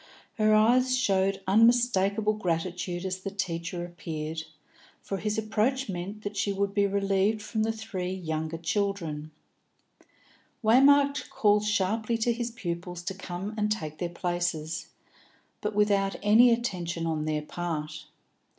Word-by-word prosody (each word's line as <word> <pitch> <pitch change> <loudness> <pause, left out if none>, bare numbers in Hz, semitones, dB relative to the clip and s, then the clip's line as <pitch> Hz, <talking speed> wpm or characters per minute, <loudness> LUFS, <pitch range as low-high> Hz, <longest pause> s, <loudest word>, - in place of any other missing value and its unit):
Her 215 0 +5
eyes 250 +4 +4
showed 195 -4 +1
unmistakable 215 -1 +3
gratitude 175 -1 -2
as 185 0 -2
the 195 - -4
teacher 175 -3 -3
appeared, 160 -2 -5 0.6
for 195 - -4
his 210 +2 -2
approach 220 +4 0
meant 195 +4 -5
that 205 0 -4
she 200 - 0
would 200 0 -1
be 200 0 +3
relieved 200 +2 +1
from 220 0 -2
the 220 +1 +1
three 190 -4 -4
elder 160 +1 -2
children. 165 -4 -2 1.3
Waymark 280 +5 +5
called 210 -1 +3
sharply 210 +3 0
to 235 +1 +1
his 235 0 -3
pupils 175 -5 -5
to 190 - -3
come 190 +1 -6
and 210 -1 0
take 155 -7 -3
their 175 - -2
places, 175 -2 -2 0.7
but 210 0 -2
without 200 -2 +2
any 220 +4 +7
attention 180 -8 -1
on 155 -2 -1
their 155 -1 -1
part. 155 -2 -4
195 Hz, 135 wpm, -28 LUFS, 175-215 Hz, 1.3 s, any